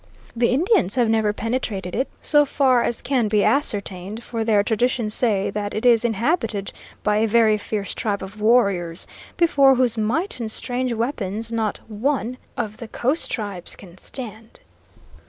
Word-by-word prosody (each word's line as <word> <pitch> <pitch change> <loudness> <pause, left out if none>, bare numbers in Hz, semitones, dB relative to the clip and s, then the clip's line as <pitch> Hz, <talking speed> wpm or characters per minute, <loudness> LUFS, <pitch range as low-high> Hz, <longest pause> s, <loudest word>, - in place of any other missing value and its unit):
"The 235 0 +3
Indians 265 - +2
have 240 -3 +2
never 220 -2 +2
penetrated 210 -5 -3
it, 265 - 0
so 295 -1 +5
far 265 -3 +3
as 235 - -2
can 250 -5 +1
be 210 -1 +2
ascertained, 205 -5 -1
for 230 -2 -3
their 215 -2 +3
traditions 225 0 0
say 210 -6 +1
that 205 0 -4
it 215 - -2
is 235 -2 +5
inhabited 230 - 0 0.3
by 210 0 +2
a 220 +1 +2
very 220 -1 +4
fierce 205 -1 -4
tribe 205 -3 -2
of 200 +2 -9
warriors, 200 -7 +2 0.3
before 280 -6 +5
whose 245 -3 +1
might 255 - -1
and 225 -2 -4
strange 250 +2 -1
weapons 225 -2 -2
not 220 -2 -1
one 245 +2 -1 0.2
of 215 -3 -3
the 230 - -8
coast 265 +8 -1
tribes 205 -6 -3
can 180 -4 -14
stand." 225 -3 -7
225 Hz, 160 wpm, -22 LUFS, 210-250 Hz, 0.3 s, so